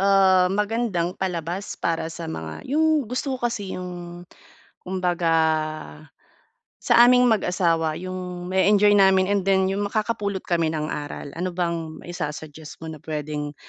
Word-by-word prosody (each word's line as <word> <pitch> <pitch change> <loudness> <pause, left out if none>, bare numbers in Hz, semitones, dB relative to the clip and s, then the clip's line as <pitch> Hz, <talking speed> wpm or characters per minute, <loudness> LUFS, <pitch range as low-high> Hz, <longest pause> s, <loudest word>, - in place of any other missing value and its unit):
ah, 190 -2 +5
magandang 205 -3 0
palabas 180 +1 -3
para 165 -1 -1
sa 165 +1 -7
mga 160 - -6
'yong 310 +1 +2
gusto 255 +3 -3
ko 245 - -6
kasi 200 -4 -5
'yong 175 -1 -7 0.6
kumbaga, 180 -3 0 1.5
sa 240 +1 +6
aming 250 0 +5
mag-asawa 170 -6 +1
'yong 180 -1 -6
ma-eenjoy 205 +2 +4
namin 190 0 +4
and 200 -2 0
then 190 -1 +3
'yong 200 +1 -1
makakapulot 210 -2 -2
kami 165 -2 +1
ng 155 0 -2
aral. 145 -1 -5
Ano 180 0 -2
bang 170 -3 -3
maisasuggest 155 -2 -7
mo 160 - -5
na 155 - -8
puwedeng 150 -1 -4
180 Hz, 135 wpm, -24 LUFS, 165-200 Hz, 1.5 s, sa